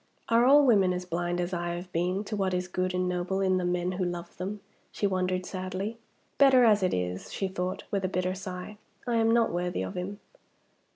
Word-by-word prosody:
"Are 230 +1 +5
all 285 +2 +7
women 200 -7 +4
as 180 0 -4
blind 175 0 -2
as 175 +1 -2
I 175 0 -2
have 180 +1 -8
been 180 +4 0
to 215 +1 -4
what 190 -2 0
is 180 0 -2
good 185 0 -1
and 180 0 0
noble 180 +1 -1
in 190 -1 +2
the - - -2
men 175 0 0
who 185 0 -2
love 175 -1 -4
them?" 195 +3 -4 0.3
she - - -2
wondered, 185 -1 0
sadly. 190 +4 -4 0.4
"Better 265 -3 +7
as 210 -3 +5
it 185 - +2
is," 90 0 -3
she 195 - -2
thought, 185 -1 -3
with 195 -1 0
a - - +2
bitter 185 0 -1
sigh; 190 +2 -7 0.3
"I 240 -2 +1
am 225 0 +3
not 230 -1 +3
worthy 175 - -2
of 95 - -5
him." 195 +3 -5
185 Hz, 220 wpm, -28 LUFS, 180-200 Hz, 0.4 s, all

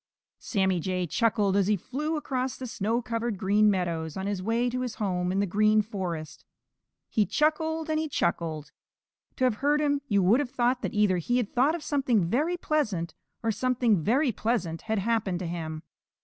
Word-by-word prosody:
_ - - -27
Sammy 190 -4 +1
Jay 180 +1 -1
chuckled 205 +2 +1
as 200 -1 +3
he 210 - +3
flew 295 - -3
across 260 -3 -2
the 260 - -6
snow 230 +1 -1
covered 230 -1 -2
Green 205 +3 +3
Meadows 170 -5 -1
on 190 - -3
his 200 -2 -2
way 230 +5 +1
to 250 +1 -2
his 250 -2 -3
home 180 -3 -1
in 190 - 0
the - - +2
Green 215 +3 +3
Forest. 180 -7 -5 0.6
He 215 - +2
chuckled 320 +1 0
and 310 0 0
he 315 -1 -2
chuckled. 160 - -2 0.6
To 260 - -2
have 250 -4 +2
heard 290 +4 +2
him 285 -1 +1
you 200 -5 +2
would 210 +8 +5
have 285 -4 -1
thought 245 0 +1
that - - -4
either 205 -3 +3
he 240 +9 0
had 235 -5 -2
thought 275 +6 +3
of 335 - -6
something 255 - +1
very 300 - 0
pleasant, 215 - -1 0.3
or 225 - +2
something 235 -3 +1
very 255 - +2
pleasant 190 -7 -2
had 220 - +1
happened 205 -3 0
to 180 - -5
him. 160 -2 -5
215 Hz, 195 wpm, -27 LUFS, 185-255 Hz, 0.6 s, would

